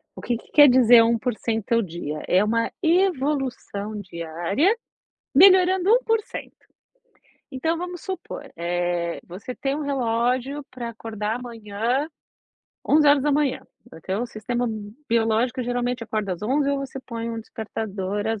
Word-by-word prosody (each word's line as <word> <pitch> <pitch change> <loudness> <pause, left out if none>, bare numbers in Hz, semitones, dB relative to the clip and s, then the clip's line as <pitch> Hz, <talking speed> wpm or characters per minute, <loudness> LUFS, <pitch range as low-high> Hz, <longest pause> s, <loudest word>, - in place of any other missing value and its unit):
O - - -9
que 240 - -1
que - - -18
quer 290 -1 +8
dizer 245 -2 +7
1% 230 -1 -1
ao 230 - +4
dia? 160 -5 -5
É 185 +2 +4
uma 230 +2 0
evolução 275 - 0
diária, 175 - 0 0.6
melhorando 370 +3 +6
1%. 450 -3 -1 1.0
Então 320 +6 -1
vamos 355 0 -6
supor, 380 -1 -7
eh, 175 0 -1
você 195 +8 -7
tem 275 0 -2
um 305 - -3
relógio 255 +1 -1
para 245 -2 -5
acordar 220 -1 -4
amanhã, 235 +3 -2 0.8
11h, 290 -1 +3 0.3
até 185 +4 -4
o 240 - -1
sistema 240 +2 -3 0.4
biológico, 230 +2 +1
geralmente, 245 0 -2
acorda 215 -3 -2
às 170 - -13
11h 275 +6 +1
ou 280 - 0
você 275 -1 -6
põe 230 -2 -5
um 230 - -4
despertador 210 -3 -4
às 225 -1 -1
235 Hz, 130 wpm, -24 LUFS, 215-280 Hz, 1.0 s, quer